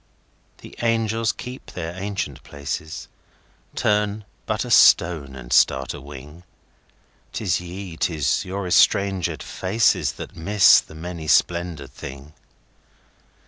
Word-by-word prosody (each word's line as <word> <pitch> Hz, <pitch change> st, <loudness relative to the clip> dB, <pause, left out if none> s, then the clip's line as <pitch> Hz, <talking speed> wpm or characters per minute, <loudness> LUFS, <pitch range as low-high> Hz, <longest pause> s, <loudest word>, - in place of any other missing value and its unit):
The -, -, -12 dB
angels 115 Hz, -1 st, +1 dB
keep 125 Hz, +1 st, -9 dB
their 85 Hz, -1 st, -5 dB
ancient 95 Hz, 0 st, -4 dB
places;—Turn 100 Hz, +7 st, -4 dB, 0.2 s
but -, -, -1 dB
a -, -, -6 dB
stone, 75 Hz, -6 st, +5 dB
and -, -, -6 dB
start 65 Hz, 0 st, +3 dB
a -, -, -9 dB
wing!'Tis 80 Hz, -, -8 dB
ye, 90 Hz, -1 st, -8 dB
'tis 80 Hz, -3 st, 0 dB
your 95 Hz, +1 st, -4 dB
estrangèd 95 Hz, 0 st, +2 dB
faces, 105 Hz, +5 st, +1 dB
That -, -, -9 dB
miss 100 Hz, +4 st, +6 dB
the 80 Hz, -, -11 dB
many 85 Hz, -1 st, -7 dB
splendoured 85 Hz, -6 st, +1 dB
thing. 70 Hz, +2 st, -10 dB
90 Hz, 105 wpm, -23 LUFS, 75-100 Hz, 0.2 s, miss